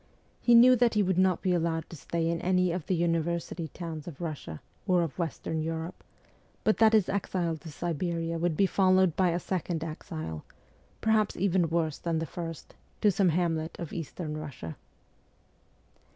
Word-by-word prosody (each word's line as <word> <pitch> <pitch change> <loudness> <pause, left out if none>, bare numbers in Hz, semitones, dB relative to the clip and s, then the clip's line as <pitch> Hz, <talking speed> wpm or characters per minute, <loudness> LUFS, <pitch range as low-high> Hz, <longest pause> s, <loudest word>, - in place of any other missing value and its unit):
He 240 - +5
knew 250 +2 +8
that 235 -1 +3
he 210 - +4
would 185 -1 +1
not 185 -2 +2
be 185 -2 +2
allowed 165 -2 0
to - - -7
stay 165 +2 -2
in 165 0 -1
any 180 -1 +2
of 170 -3 -4
the 185 - +2
university 170 0 -1
towns 160 -1 -7
of 160 -6 -8
Russia 150 - -5 0.3
or 180 -2 +4
of 165 +1 -5
Western 160 -1 -2
Europe, 165 +2 -4 0.6
but 215 - +3
that 225 -1 +5
his 215 -4 +4
exile 180 -4 -1
to 160 - -10
Siberia 165 +1 -2
would 170 -2 0
be 200 - +5
followed 185 -3 +3
by 185 -2 +3
a 170 - +1
second 175 -3 -2
exile, 80 - -6 0.6
perhaps 220 -2 +2
even 180 -3 +2
worse 160 -2 0
than 170 -1 -1
the 160 - -1
first, 165 0 -7 0.3
to 210 - +5
some 190 0 +3
hamlet 165 -1 0
of 170 - -6
Eastern 165 -1 -5
Russia. 140 - -7
170 Hz, 175 wpm, -29 LUFS, 160-185 Hz, 0.6 s, knew